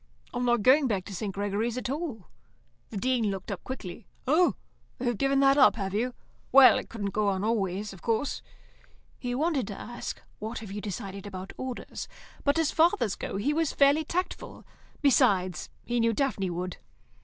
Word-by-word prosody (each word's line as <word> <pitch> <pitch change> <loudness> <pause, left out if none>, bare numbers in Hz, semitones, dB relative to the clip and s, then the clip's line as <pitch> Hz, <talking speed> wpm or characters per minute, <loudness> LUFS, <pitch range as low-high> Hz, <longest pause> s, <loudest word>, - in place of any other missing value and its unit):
"I'm 245 0 -1
not 240 -3 +2
going 270 +3 +6
back 200 -5 -1
to 200 - -8
St. 200 +2 -3
Gregory's 205 +4 -1
at 255 - -3
all." 275 - -4 0.6
The 210 - -6
Dean 240 0 +1
looked 195 +1 -4
up 195 - -5
quickly. 230 -5 -7 0.2
"Oh, 320 +7 +4 0.4
you've 240 -4 -1
given 275 0 +3
that 275 +1 +5
up, 265 - +7
have 195 -3 -3
you? 240 +4 -1 0.4
Well, 265 -1 +8
it - - -9
couldn't 205 -3 -3
go 210 +1 +1
on 195 -1 0
always, 205 -2 -1
of 185 - -13
course." 230 +5 -1 0.8
He 245 -1 -2
wanted 285 - 0
to 200 - -6
ask, 240 0 -6 0.2
"What 220 +3 -4
have 215 -3 -7
you 205 +1 -4
decided 200 -1 -6
about 190 -1 -7
Orders?" 255 -2 -6 0.4
but, 285 +2 +2
as 325 -2 +2
fathers 315 - +3
go, 195 - -4
he 275 +9 +1
was 320 -1 0
fairly 285 +3 +4
tactful. 360 +4 -4 0.4
Besides, 185 - +3 0.2
he 240 0 0
knew 230 0 +3
Daphne 215 -7 0
would. 180 +1 -4
230 Hz, 180 wpm, -28 LUFS, 200-270 Hz, 0.8 s, Well